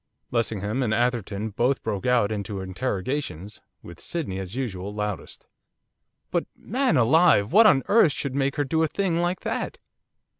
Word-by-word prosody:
Lessingham 110 0 -1
and 110 -4 +1
Atherton 110 -4 -1
both 125 +6 0
broke 105 -1 -3
out 120 -4 +3
into 100 -1 -4
interrogations, 100 - -4 0.2
with 85 -1 -11
Sydney, 140 - -4
as 95 +3 -6
usual, 100 -7 -4
loudest. 105 -5 -5 0.9
'But - - 0
man 255 - 0
alive! 125 -4 +4
what 220 +2 +8
on 135 -10 +4
earth 205 -7 +5
should 140 -1 -4
make 140 0 0
her 145 - +1
do 160 +3 0
a 160 - +3
thing 175 0 -1
like 175 +1 -1
that? - - -3
120 Hz, 155 wpm, -25 LUFS, 100-145 Hz, 0.9 s, what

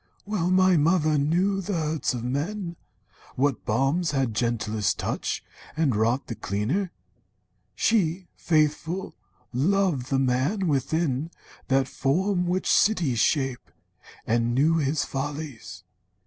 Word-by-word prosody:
Well 200 -4 -1
my 185 -1 +4
mother 155 -1 +3
knew 180 +7 +1
The 200 +2 -4
hurts 155 -5 -1
of 120 - -5
men, 170 +8 -3 0.6
what 135 -1 0
balms 135 +10 +1
had 135 -5 0
gentlest 110 -3 0
touch - - -3 0.3
And 150 -7 +2
wrought 115 +5 +1
the - - -5
cleanlier. 115 - -2 0.9
She, 185 -5 +1
faithful, 160 +3 0 0.4
loved 160 -1 +1
The 135 - +1
man 135 +10 +1
within 150 0 0 0.4
that 135 0 +2
form 180 +8 0
which 185 +2 -1
cities 165 - +3
shape, 135 -1 0 0.6
And 120 +1 +1
knew 155 +5 +3
his 145 -1 0
follies. 135 -9 -5
150 Hz, 120 wpm, -25 LUFS, 130-180 Hz, 0.9 s, my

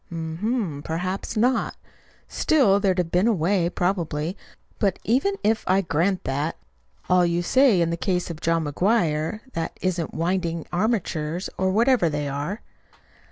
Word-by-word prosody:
"Hm 160 -1 -5 0.4
m, - - -8
perhaps 185 +7 -3
not. 250 +4 +1 0.5
Still 220 -11 +3
there'd 195 -2 +1
have 175 -2 -1
been 180 +5 +3
a 235 - +4
way, 175 0 +1
probably. 175 -2 -1 0.4
But 195 -3 +1
even 275 - +1
if 220 +1 +2
I 190 +1 +4
grant 180 +2 0
that 145 +4 -2 0.5
all 180 0 +4
you 170 0 +1
say 255 -3 +4
in 165 0 +1
the 170 - -2
case 180 0 -1
of 165 0 -9
John 165 -1 +1
McGuire 165 +2 0
that 165 -1 -4
isn't 175 -3 -2
winding 170 -1 -1
armatures, 175 -5 -1
or 190 0 0
whatever 230 -2 +3
they 145 -1 -2
are." 145 +10 -4
180 Hz, 155 wpm, -24 LUFS, 165-200 Hz, 0.5 s, a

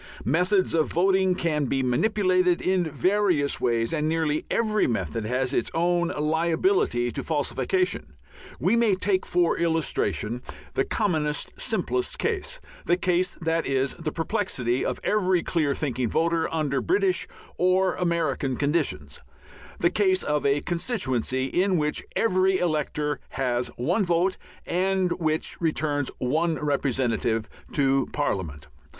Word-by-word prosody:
Methods 180 - +2
of 160 -2 +2
voting 190 +1 +3
can 155 -5 0
be 135 +1 0
manipulated 185 - +2
in 185 -1 +1
various 180 -2 +1
ways, 115 +2 +1
and 155 -1 0
nearly 160 -2 0
every 215 -2 +1
method 110 -1 -2
has 130 +3 -1
its - - 0
own 175 +1 +2
liability 160 - +1
to - - -5
falsification. 145 - -1 0.5
We 185 - +2
may 230 -4 +3
take 190 0 0
for 175 -1 +2
illustration 125 - 0 0.3
the 135 - +1
commonest, 155 -8 -1
simplest 375 0 -1
case 460 +3 -2 0.3
the 175 - +3
case 180 0 0
that 165 0 0
is 135 0 0
the 160 -3 -4
perplexity 155 - -1
of - - -2
every 185 -4 +2
clear 150 -5 0
thinking 130 -5 -2
voter 165 +3 +1
under 150 -4 0
British 380 0 +1 0.3
or 185 +1 +3
American 165 -7 -1
conditions 140 - -1 0.6
the 170 - +3
case 190 -2 +2
of 150 -1 0
a 140 +1 +2
constituency 130 - -1
in 185 +6 +1
which 150 -1 0
every 190 -3 +2
elector 150 -3 -1
has 125 -2 -1
one 175 - +1
vote, 175 +1 +1 0.3
and 185 0 +1
which 155 0 -1
returns 150 -3 0
one 160 +6 0
representative 125 -6 0 0.3
to 135 -2 +2
Parliament. 85 - -2
160 Hz, 130 wpm, -25 LUFS, 135-185 Hz, 0.6 s, voting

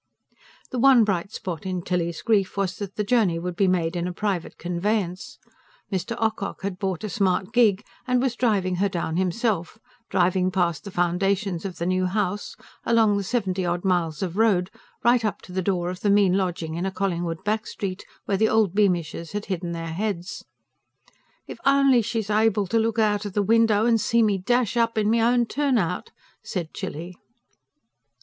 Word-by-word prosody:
The 250 - -2
one 260 -2 +6
bright 195 -2 -1
spot 170 -7 -5
in 185 -2 -3
Tilly's 170 -3 -2
grief 200 -4 +1
was 190 -2 -1
that 200 -2 -6
the 210 - -1
journey 205 -6 +2
would 175 +1 -4
be 195 +1 +2
made 175 -2 +1
in 175 0 -1
a - - -3
private 190 -2 -3
conveyance. 180 +1 -2 0.5
Mr. 195 +4 -2
Ocock 220 -4 -2
had 190 -2 -4
bought 190 -2 -2
a - - -2
smart 195 0 0
gig 215 -5 +4 0.2
and 250 0 +2
was 250 -1 0
driving 195 -7 +1
her 200 +2 +1
down 170 -3 -2
himself; 190 0 -1 0.3
driving 185 +1 +2
past 175 -3 -1
the - - -5
foundations 185 +1 0
of 185 -2 -5
the 170 - -3
new 185 0 +1
house, 205 +1 -2 0.3
along 225 -3 +3
the 200 - -1
seventy 190 -3 -1
odd 175 +1 -2
miles 175 -3 0
of 180 0 -4
road, 195 -5 +2 0.3
right 240 0 +4
up 205 -2 -1
to - - -12
the 185 +1 -1
door 180 -2 -1
of 180 - -7
the 205 - 0
mean 200 -2 +4
lodging 175 -4 -2
in 170 +3 -2
a - - -2
Collingwood 175 -3 -2
back 215 +1 -1
street, 190 -2 -5 0.2
where 195 - 0
the 220 +2 +3
old 220 -5 +2
Beamishes 175 -5 0
had 205 0 -3
hidden 175 -1 -4
their 165 -1 -5
heads. 190 -1 -3 1.0
"If - - -9
only 275 -3 +5
she's 220 -2 -3
able 215 -1 +2
to 225 +5 +1
look 225 0 0
out 210 -2 +2
of 205 - -5
the 205 - +1
window 225 0 +3
and 230 -2 +3
see 230 +2 +3
me 205 -3 +2
dash 240 +3 +1
up 230 -1 +1
in 215 0 +2
my 230 - +3
own 240 +1 +3
turn 275 +1 +1
out!" 180 -3 -2 0.3
said 170 -4 -5
Tilly. 170 +4 -6
195 Hz, 190 wpm, -24 LUFS, 180-220 Hz, 1.0 s, one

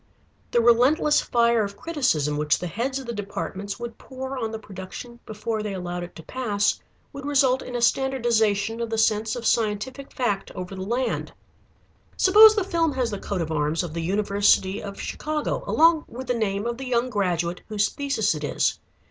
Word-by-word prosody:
The 240 - +3
relentless 255 +6 +4
fire 235 -1 +2
of 200 0 -6
criticism 250 - 0
which 150 0 +2
the - - -5
heads 240 +9 -2
of 270 - -6
the 235 - -4
departments 200 0 -5
would 235 -1 -7
pour 265 0 -6
on 230 -4 -2
the 220 - -4
production 210 +4 -9
before 215 +1 -3
they 210 -2 -4
allowed 175 -1 -4
it 175 - -8
to 165 - -10
pass 205 -4 0 0.3
would 280 0 -8
result 275 -2 +2
in 250 - -7
a 240 - -1
standardization 230 -5 +1
of 230 - -2
the 225 - -2
sense 220 0 +2
of 240 -1 -6
scientific 230 +5 -1
fact 205 -6 -1
over 185 +1 -6
the 190 - -6
land. 240 +7 -2 0.8
Suppose 430 +3 +8
the 415 - +1
film 335 -5 0
has 250 -3 -1
the 205 - -4
coat 195 -2 -3
of 160 - -5
arms 155 +2 0
of 170 -3 -6
the 165 - -3
University 200 +1 +2
of 200 -1 -8
Chicago 305 0 -3
along 325 0 +4
with 255 +3 -8
the 250 - 0
name 205 -3 -1
of 235 +1 -3
the 265 - -5
young 250 0 0
graduate 180 -4 -1
whose 210 -1 +1
thesis 275 -9 0
it 150 -1 -6
is. 145 - 0
225 Hz, 190 wpm, -24 LUFS, 200-260 Hz, 0.8 s, Suppose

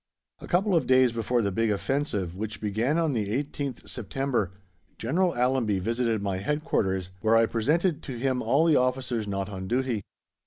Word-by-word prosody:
A - - -10
couple 190 +2 +2
of 155 -7 +2
days 130 -1 +5
before 115 +1 0
the 100 - 0
big 115 +4 +1
offensive 105 - -1
which 110 +2 -5
began 110 +8 0
on 165 -4 +1
the 110 -4 -1
18th 140 +1 -3
September, 125 -2 -2 0.5
General 175 +10 +1
Allenby 125 -4 +1
visited 115 +2 0
my 100 -2 -1
Headquarters, 95 - -1
where 110 +1 +4
I 115 - +5
presented 150 - +1
to 130 - -6
him 130 +1 0
all 140 +8 +3
the 160 -3 +4
officers 125 -3 0
not 100 -1 -2
on 95 -2 -6
duty. 125 -1 0
120 Hz, 170 wpm, -27 LUFS, 105-135 Hz, 0.5 s, days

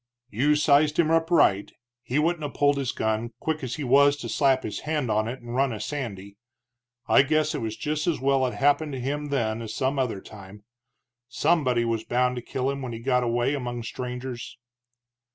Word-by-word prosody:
"You 140 +8 +2
sized 150 0 +3
him 165 -2 +3
up 165 0 +2
right. 100 - +3 0.3
He 125 +2 -3
wouldn't 160 +1 +1
'a' 145 - -2
pulled 145 0 +2
his 135 -3 -1
gun, 110 +2 -2
quick 155 -2 -2
as 125 -2 -3
he 150 - -5
was 140 +2 +4
to 120 - -6
slap 135 +2 +2
his 105 - -4
hand 150 -6 -2
on 110 +1 +1
it 125 +3 -6
and 120 0 -8
run 135 +1 +1
a 110 - -5
sandy. 100 -9 -5 0.7
I - - +6
guess 155 +2 +1
it - - -3
was 110 -1 -4
just 150 +1 -2
as 160 -6 +1
well 135 0 +2
it 125 - -5
happened 145 +1 +2
to 130 - -4
him 145 +4 -3
then 115 -5 -1
as 110 -1 -6
some 135 +1 0
other 120 -7 -1
time. 100 +1 -13 0.7
Somebody 140 -8 +1
was 115 -1 -1
bound 125 +1 +1
to - - -3
kill 130 +2 -2
him 140 0 -5
when 125 -3 -5
he 115 - -6
got 125 +1 +1
away 120 +2 0
among 120 -4 -4
strangers." 125 +1 -6
130 Hz, 205 wpm, -25 LUFS, 120-145 Hz, 0.7 s, I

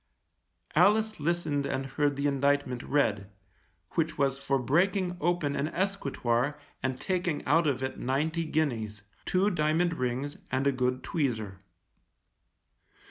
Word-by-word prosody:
Alice 220 0 +4
listened 150 -3 0
and 135 0 -2
heard 145 +1 0
the 140 +1 -2
indictment 140 -2 +1
read, 105 -10 0 0.6
which 160 -1 -1
was 135 -1 +1
for 140 0 +1
breaking 180 +8 +1
open 170 -4 +1
an 145 - 0
escritoire 145 -8 -1 0.2
and 130 -1 -2
taking 180 -5 -1
out 160 +3 +4
of 130 -2 0
it 130 - -3
ninety 155 +6 0
guineas, 115 -10 -1 0.2
two 195 +3 +2
diamond 165 +1 +2
rings 130 +1 -2
and 130 +1 0
a 140 - +4
good 125 -1 -1
tweezer. 110 - -2
145 Hz, 130 wpm, -29 LUFS, 130-165 Hz, 0.6 s, Alice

